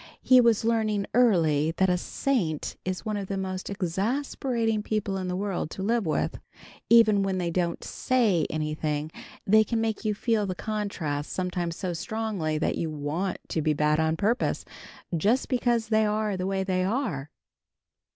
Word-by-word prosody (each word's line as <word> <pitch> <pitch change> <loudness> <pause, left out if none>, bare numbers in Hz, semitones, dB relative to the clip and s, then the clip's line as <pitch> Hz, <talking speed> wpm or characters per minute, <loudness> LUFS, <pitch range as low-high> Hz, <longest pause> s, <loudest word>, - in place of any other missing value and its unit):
He 255 -1 +7
was 230 -2 +3
learning 215 -3 +1
early 165 -10 +3
that 190 - +4
a 180 - +3
saint 180 - -1
is 185 0 -4
one 215 -1 -1
of 200 -1 -4
the 195 - -3
most 185 -1 -4
exasperating 225 - -1
people 210 -2 -2
in 185 -1 -3
the 180 - -2
world 190 -4 -2
to 190 - -6
live 225 -2 +1
with. 155 - -1 0.5
Even 220 -3 +6
when 195 -1 0
they 175 -2 -1
don't 170 -1 -1
say 215 - +1
anything, 155 0 -2 0.3
they 220 +2 +6
can 230 +1 -1
make 225 -1 -1
you 215 -2 0
feel 215 -1 0
the 185 - -3
contrast 180 -9 -3
sometimes 180 -2 -2
so 180 -1 -3
strongly 195 -4 -2
that 155 - -1
you 165 - -1
want 155 +5 -2
to 160 - -1
be 155 0 +2
bad 150 +1 +2
on 160 0 +1
purpose, 225 +7 0 0.5
just 215 +11 +1
because 240 -3 +1
they 220 -1 +3
are 210 -1 0
the 185 0 -2
way 195 0 0
they 185 -1 0
are. 185 - -2
195 Hz, 170 wpm, -27 LUFS, 170-220 Hz, 0.5 s, He